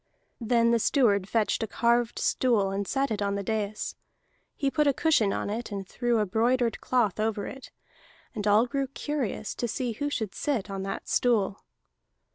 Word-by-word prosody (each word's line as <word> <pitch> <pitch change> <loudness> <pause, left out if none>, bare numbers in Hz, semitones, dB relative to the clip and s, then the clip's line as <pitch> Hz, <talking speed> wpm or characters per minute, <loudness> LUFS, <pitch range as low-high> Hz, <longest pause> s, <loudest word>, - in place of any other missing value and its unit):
Then 235 0 +3
the 235 - +3
steward 205 -7 +2
fetched 225 0 +1
a 225 - -1
carved 235 +1 +1
stool, 220 -7 +2
and 195 0 -2
set 270 -2 0
it 210 -1 -2
on 200 0 0
the 200 - -3
dais. 215 0 -2 0.6
He 275 -2 0
put 300 0 +2
a 280 - +3
cushion 265 -11 +3
in 205 - -2
it, 230 +2 -4
and 195 -2 -5
threw 240 +2 0
a 215 - +2
broidered 235 +4 +1
cloth 225 -6 +1
over 215 -2 -1
it. 270 - -9 0.6
And 210 -1 -3
all 210 +3 +5
grew 275 +1 -2
curious 270 -6 -3
to 240 - -3
see 245 +2 -2
who 285 +6 -3
should 220 -8 -3
sit 240 -10 -2
on 195 -1 -4
that 195 0 -5
stool. 210 -5 +1
225 Hz, 185 wpm, -27 LUFS, 205-250 Hz, 0.6 s, all